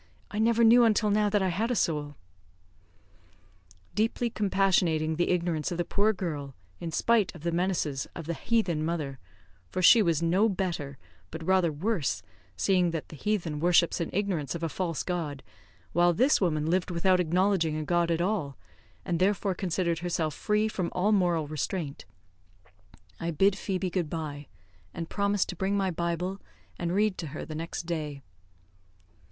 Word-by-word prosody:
I 210 - -3
never 230 +1 +3
knew 235 +2 +7
until 215 -2 +3
now 210 0 +3
that 205 -1 +2
I 190 - +1
had 210 +7 -1
a 245 - 0
soul." 150 -6 -1 1.8
Deeply 225 +4 0
compassionating 185 -6 +1
the 175 +2 0
ignorance 170 -4 0
of 175 - -3
the 175 - -1
poor 205 +5 +2
girl, 150 -9 -5 0.2
in 170 -1 -5
spite 225 +1 +2
of 170 - -11
the 170 - 0
menaces 170 -6 -1
of 165 - -6
the 170 - -2
heathen 180 -6 0
mother 155 -5 -3 0.5
for 185 - -3
she 230 +5 +8
was 170 -4 +1
no 190 +7 +3
better, 170 -8 -3 0.3
but 160 0 -7
rather 185 -3 +3
worse, 155 - -1 0.3
seeing 180 -3 +2
that 165 -2 -4
the - - -9
heathen 170 -3 -2
worships 170 +1 +3
in 165 - -2
ignorance 175 -8 -1
a 165 -1 -2
false 170 -2 -2
God, 160 -6 -3 0.5
while 175 +1 +4
this 255 - +3
woman 155 -5 +1
lived 175 +3 +1
without 180 +1 +2
acknowledging 180 -2 +1
a 155 - -2
God 175 +1 +1
at 165 0 +1
all, 175 -8 -1 0.5
and 170 - -1
therefore 195 +1 +1
considered 175 -2 -1
herself 165 -3 -1
free 210 +7 +1
from 185 -5 -2
all 195 +4 +1
moral 175 -6 +2
restraint 150 0 -4 1.1
I 170 - -2
bid 190 +5 +3
Phoebe 190 -2 -2
good 175 -4 -1
bye, 150 -3 -5 0.5
and 165 -1 -5
promised 200 -1 +1
to 180 - -4
bring 195 +3 0
my 190 -2 +1
bible, 170 +3 -2 0.4
and 170 -1 -1
read 205 +1 +1
to 165 - -4
her 145 +1 -6
the 155 - -7
next 165 +2 -4
day. 155 -5 -4
175 Hz, 170 wpm, -28 LUFS, 160-195 Hz, 1.8 s, she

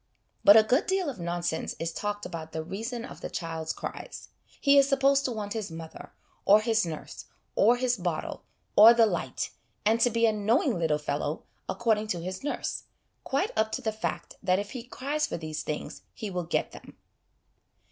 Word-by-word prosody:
But 205 +2 +9
a 220 - +8
good 250 +7 +2
deal 375 -5 +1
of 240 - -12
nonsense 170 -1 -2
is 165 0 -3
talked 205 +2 -3
about 160 -2 -7
the 160 - -3
reason 225 +7 -5
of - - -11
the - - -4
child's 160 -2 -4
cries: - - -7 0.3
he 280 0 +6
is 275 0 +4
supposed 275 0 +3
to 255 - 0
want 210 -3 -4
his 220 -4 -3
mother, 165 0 -9 0.3
or 205 +2 +7
his 225 -4 +1
nurse, 155 -2 -7 0.3
or 235 +4 +4
his 245 -1 +1
bottle, 175 -4 -3 0.3
or 225 +3 +10
the 230 -1 +6
light, 215 - -2 0.3
and 225 +2 +3
to 245 - +5
be 230 0 +2
'a 225 - +4
knowing 225 - +1
little 160 -3 +2
fellow,' 150 +1 -3 0.3
according 220 -2 +1
to 180 -5 -2
his 185 +5 -5
nurse, 290 - -3 0.4
quite 275 +1 0
up 220 0 +1
to 260 - -2
the 220 - 0
fact 215 0 -4
that 185 0 +2
if 200 +1 -4
he 255 - -5
cries 280 +5 -2
for - - -4
these 155 -1 -5
\hings 150 - -5
he 215 -4 -5
will 180 -2 -2
get 170 - -1
them. - - -13
215 Hz, 195 wpm, -28 LUFS, 170-245 Hz, 0.4 s, or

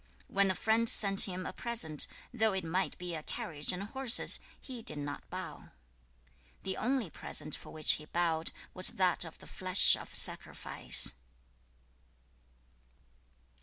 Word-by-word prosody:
2. - - -21
When 195 0 +2
a 190 - 0
friend 225 +3 +1
sent 195 -1 +6
him 185 0 -6
a - - -6
present, 220 - +4 0.3
though 220 -3 +1
it 190 -1 -3
might 180 +4 -2
be 180 -1 -6
a 160 - -5
carriage 150 -1 -3
and 180 +2 -5
horses, 255 +3 +2 0.2
he 255 -3 -9
did 185 - +1
not 145 0 -7
bow. - - -9 0.9
3. 190 - -3
The - - -9
only 245 - -2
present 155 - -4
for - - -12
which 155 -1 +2
he 150 - -5
bowed 165 0 -2 0.2
was 185 0 +4
that 185 -2 +2
of 165 -2 -10
the - - -15
flesh 185 +1 +3
of - - -11
sacrifice. - - +2
185 Hz, 155 wpm, -31 LUFS, 160-220 Hz, 0.9 s, sent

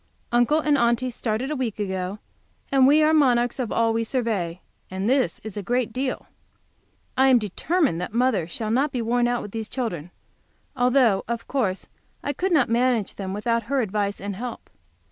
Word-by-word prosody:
Uncle 240 +6 +3
and 295 -2 +2
Aunty 235 +2 +1
started 240 +3 -2
a - - -1
week 250 -6 -2
ago, 190 -1 -3 0.5
and 265 -1 +5
we 300 +2 +5
are 310 +1 +4
monarchs 245 -5 +3
of 245 -4 -2
all 230 0 +2
we 230 0 0
survey, 220 -9 -2 0.3
and 190 +2 -3
this 260 +1 +1
is 220 -2 -7
a 205 - -3
great 245 +2 -1
deal. 255 +1 -2 0.9
I 265 +1 +4
am 260 -2 +6
determined 235 - 0
that 180 - -4
mother 230 -7 +1
shall 215 +5 -4
not 270 +5 +2
be 245 -3 -2
worn 240 +1 +2
out 245 0 -1
with 205 - -8
these 220 0 -5
children, 180 - -4 0.7
although 245 -5 +3
of 235 0 -4
course 210 -9 -1 0.4
I 285 - -1
could 370 +7 -1
not 295 -7 +4
manage 235 -2 +1
them 190 -2 -5
without 230 +4 0
her 280 -1 +2
advice 205 -3 -1
and 200 0 -5
help. 245 +2 -7
235 Hz, 185 wpm, -24 LUFS, 210-260 Hz, 0.9 s, am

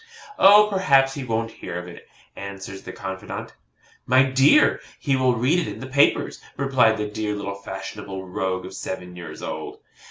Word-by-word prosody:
'Oh, 210 +2 +8
perhaps 140 -9 +3
he 140 - -5
won't 115 -2 -2
hear 85 - -7
of 90 0 -6
it,' 85 - -12 0.3
answers 95 -1 -8
the - - -8
confidante. 95 -1 -7 0.5
'MY 130 +1 +4
DEAR, 135 - +5 0.2
HE 140 -2 +1
WILL 130 -1 +2
READ 130 +10 +2
IT 170 - -2
IN - - -6
THE 130 - -7
PAPERS,' 140 +2 +2 0.2
replied 130 -5 +3
the 105 - -2
dear 105 0 -3
little 100 -1 -4
fashionable 95 0 -7
rogue 95 0 -2
of 95 - -9
seven 90 -2 -6
years 85 -3 -9
old. - - -6
110 Hz, 170 wpm, -23 LUFS, 95-135 Hz, 0.5 s, Oh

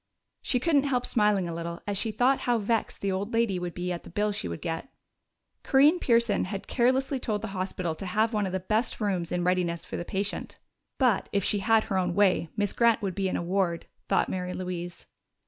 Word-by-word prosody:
She 250 - +1
couldn't 285 0 +2
help 250 -3 +1
smiling 210 -5 +2
a 170 - -4
little 170 +1 -5
as 205 - -2
she 220 +3 0
thought 250 +5 +3
how 240 - +4
vexed 225 +1 -1
the 200 - 0
old 200 +4 -3
lady 225 -5 +1
would 175 -1 -5
be 180 0 -3
at 175 - -3
the - - -12
bill 210 +4 0
she 200 - -4
would 85 -1 -5
get. 165 +10 -4 0.7
Corinne 295 +6 +4
Pearson 235 - +2
had 195 +1 -5
carelessly 260 +2 +1
told 215 -3 -2
the 220 - -3
hospital 185 -3 -3
to 185 +4 -7
have 215 +5 +1
one 210 -2 +1
of - - -4
the 190 - -1
best 215 +6 -1
rooms 190 -6 -1
in 180 0 0
readiness 175 -2 0
for - - -5
the - - -3
patient. 195 +3 -3 0.4
("But, 250 -7 +2
if 200 -2 +1
she 205 - +2
had 220 +2 +3
her 190 -2 -1
own 180 -1 -1
way, 190 -5 +3
Miss 205 -2 0
Grant 230 -2 +3
would 190 -2 -1
be 195 +1 -1
in - - -1
a - - -3
ward," 175 -1 0 0.2
thought - - +2
Mary 180 -1 -3
Louise.) 175 -1 -5
200 Hz, 225 wpm, -27 LUFS, 180-230 Hz, 0.7 s, how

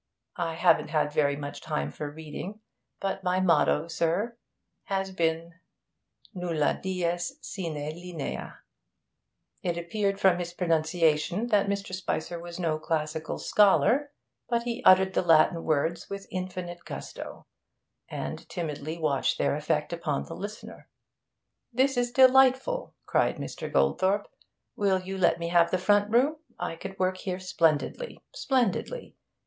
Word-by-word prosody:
I 165 -1 -2
haven't - - +4
had 150 -1 0
very 145 -2 +2
much 145 0 -6
time 70 +1 -2
for 150 - -5
reading, 160 +7 -7 0.4
but 195 -1 -3
my 185 0 +1
motto, 165 -3 +3
sir, 170 +8 0 0.5
has 195 -1 -2
been 165 -2 -1 0.8
nulla 170 -5 0
dies 175 -2 -1
sine 170 -5 -5
linea.' 155 +1 -6 1.0
It 175 -2 -1
appeared 195 +3 -1
from 190 -3 +4
his 175 0 -4
pronunciation 165 +3 +1
that 205 -3 +3
Mr. 200 -1 -2
Spicer 175 -2 -3
was 175 +1 -8
no 160 -3 0
classical 155 0 -2
scholar, 245 +7 +4 0.4
but 235 -1 +1
he 235 -1 -4
uttered 190 0 +6
the - - +2
Latin 165 -1 +4
words 160 +2 0
with 200 0 -6
infinite 180 -2 -5
gusto, - - -8 0.6
and - - -5
timidly 155 -2 -4
watched 150 -5 +1
their - - +1
effect - - -1
upon 70 - -1
the - - -8
listener. 205 +2 -8 0.8
'This 265 +2 +3
is 245 0 0
delightful,' 265 - +4
cried - - +2
Mr. - - -6
Goldthorpe. 195 +2 +2 0.5
'Will 195 -2 +2
you 190 +1 -5
let 175 - +4
me 170 0 -3
have 170 -1 +4
the 185 - +1
front 205 +2 +3
room? 265 +7 +3 0.2
I - - -3
could 190 +3 -8
work 185 0 +1
here 185 -1 -3
splendidly 175 - 0
splendidly! 280 - -1
180 Hz, 135 wpm, -28 LUFS, 160-200 Hz, 1.0 s, uttered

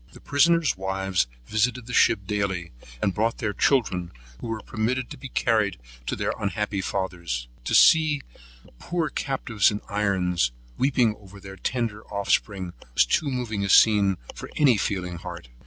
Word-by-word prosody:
The - - -13
prisoners' 165 +2 +3
wives 95 -3 -1 0.2
visited 115 - 0
the 125 - -7
ship 110 -4 +4
daily 95 -4 -2 0.3
and 95 - +2
brought 115 +3 0
their 105 -2 -2
children, 90 -12 +1 0.3
who - - -6
were 110 -1 -3
permitted 120 +4 -2
to 150 - -7
be 135 - -9
carried 110 - +1 0.3
to - - -1
their - - -1
unhappy 105 -1 -2
fathers. 85 -11 -3 0.2
To - - +1
see 155 -3 +5 0.4
the - - -19
poor 170 -3 -2
captives 120 -7 +1
in 105 -2 -3
irons, 90 -9 +1 0.2
weeping 125 -5 +2
over 100 -1 -14
their 95 0 -10
tender 110 -1 -2
offspring, 100 -2 -1 0.2
was - - +5
too 140 - +1
moving 120 -6 -2
a 100 - -2
scene 100 -2 +5 0.2
for - - -9
any 140 -5 +5
feeling 90 -3 -2
heart. 85 -7 -8
105 Hz, 160 wpm, -25 LUFS, 95-125 Hz, 0.4 s, see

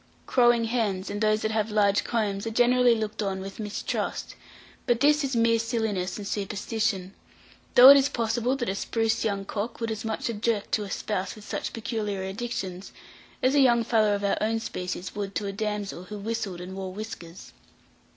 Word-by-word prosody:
Crowing 240 -2 +4
hens, 220 -5 -1
and 205 +1 -4
those 215 0 +2
that 220 - 0
have 220 0 0
large 205 -1 +3
combs, 210 -3 -1
are - - 0
generally 245 +1 +4
looked 215 -1 -3
on 195 -2 -2
with 195 +2 -8
mistrust; 210 -1 -3 0.5
but 240 -2 +3
this 295 +2 +4
is 270 -2 -1
mere 230 0 +3
silliness 220 -6 -1
and 205 -2 -6
superstition 205 -1 -2 0.6
though 250 +2 +11
it 280 - +9
is 275 +1 +3
possible 235 +2 0
that 245 -3 -3
a - - 0
spruce 225 +2 0
young 200 -3 -1
cock 220 +3 -4
would 230 -1 -2
as 220 -1 -4
much 220 -1 -2
object 220 -2 -1
to 215 - +1
a 200 - -7
spouse 195 -1 -3
with 210 -1 -13
such - - -3
peculiar 210 -3 -3
addictions, 190 -2 -5 0.5
as 255 +1 +4
a 290 - +4
young 240 -3 +5
fellow 215 -3 +3
of 200 - -4
our 200 - +1
own 225 +1 +1
species 180 -3 -5
would 200 -1 -5
to 205 - -1
a 200 - -2
damsel 205 -3 -4
who 210 +3 -7
whistled 205 -4 -4
and 180 +1 -7
who 190 - -8
wore 190 -1 -4
whiskers. 185 -4 -9
215 Hz, 195 wpm, -26 LUFS, 200-230 Hz, 0.6 s, though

